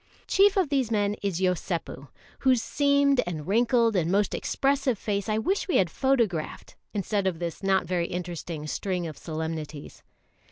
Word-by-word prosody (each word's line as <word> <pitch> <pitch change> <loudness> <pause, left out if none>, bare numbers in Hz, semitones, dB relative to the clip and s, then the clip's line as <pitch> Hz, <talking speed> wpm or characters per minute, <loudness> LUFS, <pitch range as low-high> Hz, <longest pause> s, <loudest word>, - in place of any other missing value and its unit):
Chief 400 +1 +4
of 370 -6 +2
these 270 -5 +1
men 205 -2 +1
is 195 -4 -1
Yosépu, 175 -6 -2 0.3
whose 260 -2 +3
seamed 280 -1 +3
and 155 -4 -4
wrinkled 230 +1 +3
and 175 -2 +1
most 200 0 +2
expressive 270 -3 0
face 200 0 -2
I 215 - +1
wish 375 - 0
we 365 - +2
had 175 -3 +2
photographed, 230 -12 -1 0.2
instead 200 -1 -1
of 180 -3 -1
this 170 -1 -5
not 195 -1 +2
very 175 -2 -1
interesting 175 -3 -5
string 180 +3 -2
of 155 -2 -6
solemnities. 160 -2 -6
195 Hz, 160 wpm, -27 LUFS, 170-250 Hz, 0.3 s, Chief